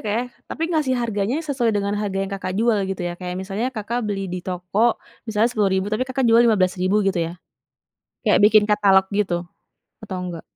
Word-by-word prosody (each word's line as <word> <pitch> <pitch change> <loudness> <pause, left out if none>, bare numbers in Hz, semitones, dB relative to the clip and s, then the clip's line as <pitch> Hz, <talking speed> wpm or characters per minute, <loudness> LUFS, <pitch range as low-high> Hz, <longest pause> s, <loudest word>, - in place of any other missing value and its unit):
Kak 210 - -1
ya, 235 - +1 0.3
tapi 320 - -5
ngasih 300 -6 +1
harganya 225 0 -1
sesuai 265 -7 0
dengan 200 0 0
harga 200 -2 -2
yang 195 - -4
Kakak 185 -1 -4
jual 225 0 +2
gitu 195 - -4
ya, 175 0 -3
kayak 180 -1 -5
misalnya 200 +6 -2
Kakak 230 +2 -3
beli 195 -2 -3
di 180 0 -4
toko 185 +6 0 0.3
misalnya 220 +1 +2
10.000 195 -4 +1
tapi 215 +4 0
Kakak 260 0 -1
jual 230 +1 +6
15.000 190 -2 +2
gitu 195 -2 +1
ya, 165 +1 -3 0.9
kayak - - +4
bikin 215 0 +6
katalog 200 -2 +4
gitu, 190 -4 0 0.6
atau 195 -3 -5
enggak? 175 -2 -6
205 Hz, 190 wpm, -22 LUFS, 190-230 Hz, 0.9 s, jual